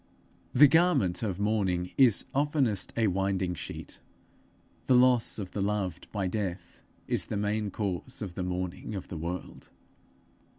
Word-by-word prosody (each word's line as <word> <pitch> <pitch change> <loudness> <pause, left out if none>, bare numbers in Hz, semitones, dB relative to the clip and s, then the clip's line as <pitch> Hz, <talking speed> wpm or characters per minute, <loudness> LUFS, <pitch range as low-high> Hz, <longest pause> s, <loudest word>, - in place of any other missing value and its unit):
The 145 +3 +8
garment 160 - +3
of 100 -5 -2
mourning 95 -4 0
is 125 -6 +4
oftenest 140 - +1
a 115 - +3
winding 95 -2 0
sheet; 85 - -8 0.9
the 130 - +5
loss 125 -1 +4
of 95 -4 -5
the 100 - -3
loved 95 -4 -2
by 100 -3 -2
death 90 -2 -4 0.3
is - - -1
the 105 - -2
main 105 +1 -1
cause 100 +5 -4
of 95 -4 -6
the 90 - -4
mourning 90 +3 -3
of 95 - -6
the 90 - -5
world. 85 +3 -6
100 Hz, 145 wpm, -29 LUFS, 90-110 Hz, 0.9 s, The